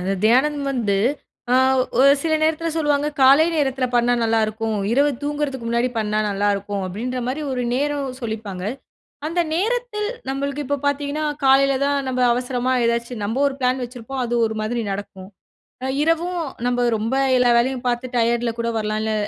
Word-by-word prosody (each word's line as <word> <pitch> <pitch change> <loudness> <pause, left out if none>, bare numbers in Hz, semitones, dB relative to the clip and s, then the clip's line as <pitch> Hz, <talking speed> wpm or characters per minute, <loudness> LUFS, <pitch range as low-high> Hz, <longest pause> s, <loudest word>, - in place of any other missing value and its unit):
அந்த 190 +2 -1
தியானம் 280 +5 +3
வந்து, 225 -7 0 0.6
ஆ - - +5 0.4
ஒரு 275 +1 +7
சில 320 -1 +1
நேரத்துல 320 +1 +1
சொல்லுவாங்க. 295 -2 +1
காலை 275 +5 +7
நேரத்துல 265 -3 +1
பண்ணா 240 0 +3
நல்லா 225 0 +2
இருக்கும். 220 0 -3 0.2
இரவு 285 +3 +3
தூங்குறதுக்கு 290 -4 -3
முன்னாடி 235 +2 +1
பண்ணா 210 0 0
நல்லா 200 +1 0
இருக்கும் 200 0 -4
அப்டின்ற 245 +7 -4
மாரி 290 +4 -3
ஒரு 250 -1 -2
நேரம் 285 0 -1
சொல்லிப்பாங்க. 215 -5 -5 0.6
அந்த 335 +3 0
நேரத்தில் 435 +2 -1 0.2
நம்மளுக்கு 280 +2 -2
இப்போ 285 - 0
பாத்தீங்கன்னா, 285 +2 -1 0.2
காலையில 270 +1 +5
தான் 285 0 +1
நம்ப 255 -1 -1
அவசரமா 250 +1 -1
ஏதாச்சும் 235 -1 -1
நம்ப 225 +5 -2
ஒரு 275 - -1
பிளான் 255 0 +1
வச்சிருப்போம். 250 +2 -6
அது 240 0 -2
ஒரு 220 - -4
மாதிரி 235 +2 -2
நடக்கும். 195 -1 -7 0.6
அ 260 - -1 0.2
இரவும் 335 +2 0 0.3
நம்ம 245 0 +1
ரொம்ப 225 +5 -2 0.2
எல்லா 250 -1 +4
வேலையும் 255 +1 0
பாத்து 245 +1 -1
டயர்டுல 235 0 +1
கூட 235 - -1
வரலாம், 215 0 -1
இல்ல 220 - -1
255 Hz, 165 wpm, -21 LUFS, 230-285 Hz, 0.6 s, ஒரு